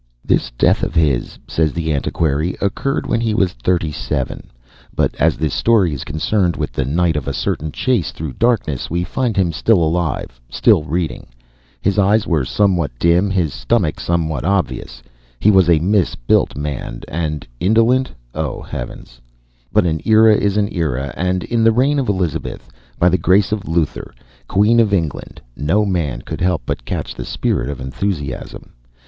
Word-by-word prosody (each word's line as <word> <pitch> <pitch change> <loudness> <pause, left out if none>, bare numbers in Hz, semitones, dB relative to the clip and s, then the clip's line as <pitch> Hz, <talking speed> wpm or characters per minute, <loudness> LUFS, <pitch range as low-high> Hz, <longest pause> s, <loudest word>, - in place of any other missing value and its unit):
This - - +1
death - - +3
of - - -2
his, 75 -7 +1
says 80 -3 0
the 80 -2 -1
antiquary, 75 +3 -1
occurred 120 +8 -1
when 115 - 0
he 110 -2 0
was 95 -5 +1
thirty 80 +5 0
seven, - - -4 0.5
but - - +1
as - - +3
this 80 -3 -1
story 105 -9 +3
is 70 - -5
concerned 85 +5 0
with - - -3
the 65 - -2
night 80 +4 +1
of 75 -4 -3
a - - -1
certain 75 0 -2
chase 115 - 0
through 75 -3 -6
darkness, 110 - 0
we 85 +2 -1
find 120 +2 -2
him 90 -3 +2
still 100 +7 +2
alive, 80 -7 -1
still 75 - +3
reading. 80 +1 -3 0.5
His 100 +1 +1
eyes 100 +2 +3
were 80 -7 +1
somewhat 90 -1 +1
dim, 85 +7 +3
his 90 -7 0
stomach 95 -7 0
somewhat 80 -6 -1
obvious 95 +1 -2 0.4
he 105 - +5
was 95 -3 +4
a 85 - +6
mis 95 +3 +1
built - - +1
man 70 -4 -4
and 75 -2 -3
indolent 115 +7 +3 0.2
oh, 80 -3 -3
Heavens! - - -8 0.5
But - - +3
an 80 -2 0
era 110 0 +6
is 100 0 +1
an 105 -1 +1
era, 70 -6 -2
and 90 0 -1
in 115 -1 0
the 115 - +6
reign 135 +5 +2
of 130 - -1
Elizabeth, 90 -6 -2 0.3
by 90 - +3
the 90 0 +3
grace 95 +4 +3
of 105 -2 -2
Luther, 80 -2 -2 0.3
Queen 105 +4 +3
of 105 -3 +3
England, 80 -6 -4
no 100 +9 +1
man 75 -11 -2
could - - -6
help 90 -5 +1
but - - -4
catch - - -4
the - - -6
spirit - - -1
of 70 - -5
enthusiasm. 70 +1 -4
85 Hz, 175 wpm, -18 LUFS, 75-100 Hz, 0.5 s, a